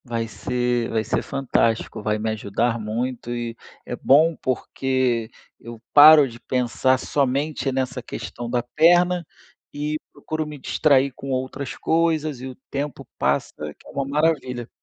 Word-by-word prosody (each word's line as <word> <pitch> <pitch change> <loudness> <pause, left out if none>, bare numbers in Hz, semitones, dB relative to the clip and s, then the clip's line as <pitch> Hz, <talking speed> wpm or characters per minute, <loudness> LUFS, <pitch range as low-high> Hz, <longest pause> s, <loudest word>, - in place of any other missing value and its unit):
Vai 115 -2 -2
ser 125 0 -1
vai 110 -1 0
ser 110 - -1
fantástico, 115 -5 0
vai 105 0 0
me 110 +1 -2
ajudar 115 +2 -1
muito 120 +3 -3
e 120 -1 -4 0.3
é - - -4
bom 155 +4 +4
porque 130 -2 -1 0.3
eu 115 -1 -10
paro 150 -1 +9
de 120 -1 -11
pensar 130 +1 +1
somente 140 +2 -1
nessa 130 -1 -2
questão 120 0 -7
da 120 0 0
perna 175 +6 +3 0.5
e 150 +1 -3
procuro 155 -1 -4
me 150 -1 -8
distrair 140 0 +2
com 135 - -8
outras 130 +1 -3
coisas 160 -4 0
e 130 - -5
o 130 - -8 0.2
tempo 140 0 -4
passa - - 0 0.2
que - - -20
é - - -11
uma 140 - -2
maravilha. 140 -5 0
130 Hz, 150 wpm, -23 LUFS, 120-145 Hz, 0.5 s, paro